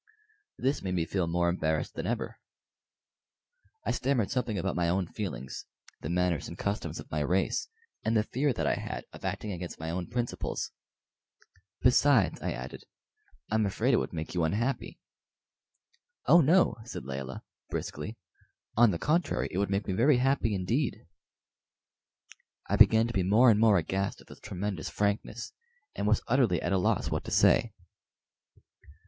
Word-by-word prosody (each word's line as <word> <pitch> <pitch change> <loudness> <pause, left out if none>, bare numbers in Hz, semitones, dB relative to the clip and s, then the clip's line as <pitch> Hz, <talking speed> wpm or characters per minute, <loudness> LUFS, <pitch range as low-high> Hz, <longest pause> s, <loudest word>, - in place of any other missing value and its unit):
This 135 +3 0
made 90 -1 -2
me 85 -2 +1
feel 90 -1 -1
more 85 +1 +1
embarrassed 80 -3 0
than - - -4
ever. - - -3 1.5
I - - +1
stammered 125 -6 0
something 120 -5 -1
about 95 0 -1
my 85 -1 +1
own 95 +1 +1
feelings 80 - -6 0.3
the - - -4
manners 90 -2 0
and - - -8
customs 100 +1 -3
of - - -11
my 75 - -1
race 90 +6 0 0.4
and 110 +1 +2
the 105 - +3
fear 135 +6 0
that 120 - -2
I - - +3
had - - -5
of - - -12
acting 105 - -3
against 90 -1 -6
my 80 +1 -3
own 90 +1 -3
principles. 120 +1 -3 1.1
"Besides," 125 -3 +4
I - - -2
added, 65 +2 -7 0.7
"I'm 110 -1 +2
afraid 115 +7 +1
it - - +5
would - - -2
make 80 -2 -5
you 90 -2 +1
unhappy." 115 +12 -1 1.3
"Oh 170 - +7
no," 170 +2 +4
said 115 - -7
Layelah, 65 0 -5 0.3
briskly; 110 +3 -5 0.6
"on 120 0 +6
the 90 - -1
contrary, 165 - 0
it 95 - -2
would 100 - 0
make 100 +1 0
me 95 - -2
very 125 +7 +4
happy 125 -4 +1
indeed." 110 - -1 1.6
I - - +1
began 110 0 +6
to 115 - -4
be 100 - +1
more 110 +7 +6
and 105 - +3
more 110 -3 +5
aghast 95 +4 -1
at - - -16
this - - -13
tremendous 100 -3 -4
frankness, 105 +3 -2 0.4
and 105 - -2
was 105 0 +2
utterly 120 -8 +3
at - - -1
a 95 - +3
loss - - +1
what - - -1
to - - -5
say. - - +4
100 Hz, 165 wpm, -29 LUFS, 90-120 Hz, 1.6 s, Oh